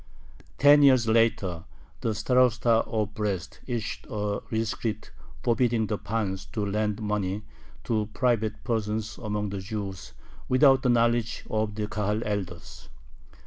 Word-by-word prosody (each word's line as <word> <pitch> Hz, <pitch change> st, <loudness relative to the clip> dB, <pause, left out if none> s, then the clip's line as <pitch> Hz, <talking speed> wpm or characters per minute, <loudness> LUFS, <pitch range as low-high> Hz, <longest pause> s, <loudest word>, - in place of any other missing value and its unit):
Ten 145 Hz, +1 st, +7 dB
years 130 Hz, -5 st, +5 dB
later 110 Hz, -7 st, +2 dB, 0.4 s
the 110 Hz, -2 st, -1 dB
Starosta 120 Hz, 0 st, +3 dB
of 105 Hz, -2 st, -2 dB
Brest 100 Hz, -4 st, -3 dB
issued 120 Hz, -3 st, -4 dB
a 105 Hz, -1 st, -2 dB
rescript 110 Hz, 0 st, -2 dB, 0.3 s
forbidding 120 Hz, -1 st, +2 dB
the 105 Hz, -1 st, -3 dB
pans 105 Hz, -4 st, -2 dB
to 105 Hz, -3 st, -1 dB
lend 105 Hz, +1 st, -1 dB
money 105 Hz, -1 st, -2 dB, 0.4 s
to 110 Hz, -2 st, -1 dB
private 110 Hz, -3 st, 0 dB
persons 110 Hz, -2 st, -2 dB
among 105 Hz, -1 st, -2 dB
the 100 Hz, 0 st, -4 dB
Jews 95 Hz, -1 st, -6 dB, 0.4 s
without 135 Hz, +1 st, +5 dB
the 125 Hz, -, +1 dB
knowledge 115 Hz, -1 st, +1 dB
of 110 Hz, -1 st, -1 dB
the 105 Hz, 0 st, -2 dB
Kahal 105 Hz, +1 st, -1 dB
elders. 95 Hz, -5 st, -5 dB
110 Hz, 130 wpm, -27 LUFS, 105-115 Hz, 0.4 s, Ten